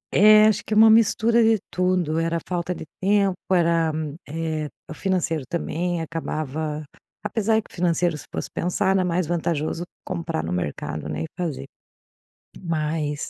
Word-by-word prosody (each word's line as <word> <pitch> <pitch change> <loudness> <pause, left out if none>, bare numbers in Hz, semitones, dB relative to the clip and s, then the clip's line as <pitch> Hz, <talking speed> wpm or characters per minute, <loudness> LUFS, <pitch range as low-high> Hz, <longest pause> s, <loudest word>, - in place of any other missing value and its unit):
É, 215 +2 +8
acho 215 -2 +3
que 215 - -2
é - - +3
uma 220 0 +8
mistura 230 +1 +4
de 225 0 +4
tudo. 180 -3 +1
Era 165 0 0
falta 180 0 -2
de 160 - -8 0.2
tempo. 200 0 +3 0.2
Era, 170 -2 +3 0.4
eh, 160 -1 -2 0.2
o - - -7
financeiro 165 -3 -1
também 170 0 -2
acabava 155 -1 -4 0.4
apesar 220 +1 +1
de 220 - +2
que - - -20
o - - -10
financeiro, 175 -1 +1
se - - -9
fosse - - -4
pensar, 190 +2 0
era 190 -1 +2
mais 180 0 0
vantajoso 165 0 -1 0.2
comprar 165 - -3
no 80 - -4
mercado, 75 -3 -4
né, - - -3
e - - -2
fazer. 165 - -3 1.0
Mas, 155 -3 -2
170 Hz, 165 wpm, -23 LUFS, 155-190 Hz, 1.0 s, É